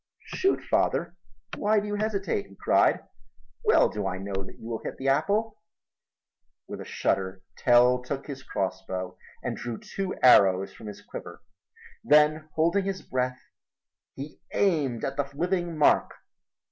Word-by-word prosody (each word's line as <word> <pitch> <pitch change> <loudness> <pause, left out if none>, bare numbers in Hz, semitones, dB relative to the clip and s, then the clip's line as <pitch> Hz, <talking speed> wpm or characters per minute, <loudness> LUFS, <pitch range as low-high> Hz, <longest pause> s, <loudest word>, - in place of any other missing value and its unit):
"Shoot, 385 - +1
father, 170 +1 0 0.4
why 210 +1 +3
do 205 - -5
you 205 - -3
hesitate?" 205 - -1
he 100 - -17
cried. - - +3 0.6
"Well - - +5
do 105 -2 -3
I 95 -1 -3
know 100 +1 -6
that 95 0 -5
you 115 - -10
will 115 -1 -4
hit - - -5
the 135 +1 -1
apple." 205 +10 +1 1.1
With - - -7
a - - -8
shudder 95 0 -1
Tell 125 +1 +4
took 135 +2 -5
his 135 -2 -7
crossbow 95 -2 -4 0.3
and - - -2
drew 120 -2 -5
two 195 -1 -4
arrows 95 -6 +6
from 110 - -11
his 105 - -9
quiver. 85 - -9 0.6
Then 150 +1 +4
holding 170 +5 +2
his 195 -1 -3
breath 125 0 -2 0.7
he 140 +3 -8 0.2
aimed 145 - +1
at 135 +1 -4
the 140 -1 -1
living 175 0 -1
mark. 150 - +3
135 Hz, 150 wpm, -27 LUFS, -, 1.1 s, arrows